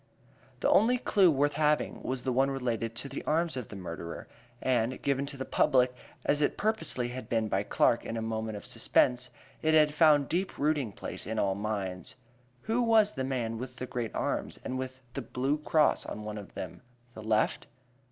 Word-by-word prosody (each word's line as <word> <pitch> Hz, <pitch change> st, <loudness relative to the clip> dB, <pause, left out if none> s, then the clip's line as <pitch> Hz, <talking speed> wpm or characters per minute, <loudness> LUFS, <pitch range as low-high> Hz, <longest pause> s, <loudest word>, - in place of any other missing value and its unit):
The -, -, +3 dB
only 245 Hz, +4 st, +5 dB
clue 200 Hz, -6 st, +4 dB
worth 145 Hz, -1 st, +2 dB
having 150 Hz, 0 st, +1 dB
was 130 Hz, -1 st, -3 dB
that 130 Hz, -, 0 dB
one 135 Hz, +2 st, +3 dB
relating 120 Hz, -4 st, -1 dB
to 115 Hz, +5 st, -4 dB
the 140 Hz, -, -6 dB
arms 165 Hz, -1 st, +1 dB
of 125 Hz, -4 st, -4 dB
the -, -, -8 dB
murderer, 85 Hz, -3 st, -6 dB, 0.3 s
and, 125 Hz, -1 st, 0 dB
given 140 Hz, 0 st, 0 dB
to 140 Hz, -, -4 dB
the 130 Hz, -, -4 dB
public 125 Hz, -1 st, +3 dB, 0.3 s
as 145 Hz, +1 st, +2 dB
it 145 Hz, -, +1 dB
purposely 215 Hz, -, 0 dB
had 125 Hz, -2 st, -7 dB
been 110 Hz, -2 st, +1 dB
by 95 Hz, -1 st, +1 dB
Clark 115 Hz, +3 st, +2 dB
in 115 Hz, -, -4 dB
a -, -, -2 dB
moment 110 Hz, -1 st, -3 dB
of -, -, -10 dB
suspense, 125 Hz, 0 st, +2 dB, 0.3 s
it 155 Hz, 0 st, +3 dB
had 150 Hz, -1 st, +5 dB
found 150 Hz, -3 st, +5 dB
deep 185 Hz, +3 st, -2 dB
rooting 145 Hz, -6 st, +1 dB
place 100 Hz, -, -7 dB
in 110 Hz, +1 st, -3 dB
all 100 Hz, -2 st, +2 dB
minds. 100 Hz, -3 st, -4 dB, 0.5 s
Who 225 Hz, +3 st, +1 dB
was 225 Hz, -3 st, +4 dB
the 130 Hz, -, -3 dB
man 120 Hz, -4 st, -2 dB
with 125 Hz, 0 st, -6 dB
the 125 Hz, -, -5 dB
great 120 Hz, -3 st, -4 dB
arms, -, -, -2 dB
and 130 Hz, -, -3 dB
with 130 Hz, 0 st, -6 dB
the 135 Hz, -, -3 dB
"blue 135 Hz, +5 st, -1 dB
cross" 150 Hz, 0 st, +3 dB
on 105 Hz, -, -6 dB
one 105 Hz, 0 st, -5 dB
of 100 Hz, -, -12 dB
them 90 Hz, -1 st, -6 dB, 0.3 s
the 110 Hz, -, -9 dB
left? 110 Hz, 0 st, +1 dB
130 Hz, 200 wpm, -30 LUFS, 110-150 Hz, 0.5 s, only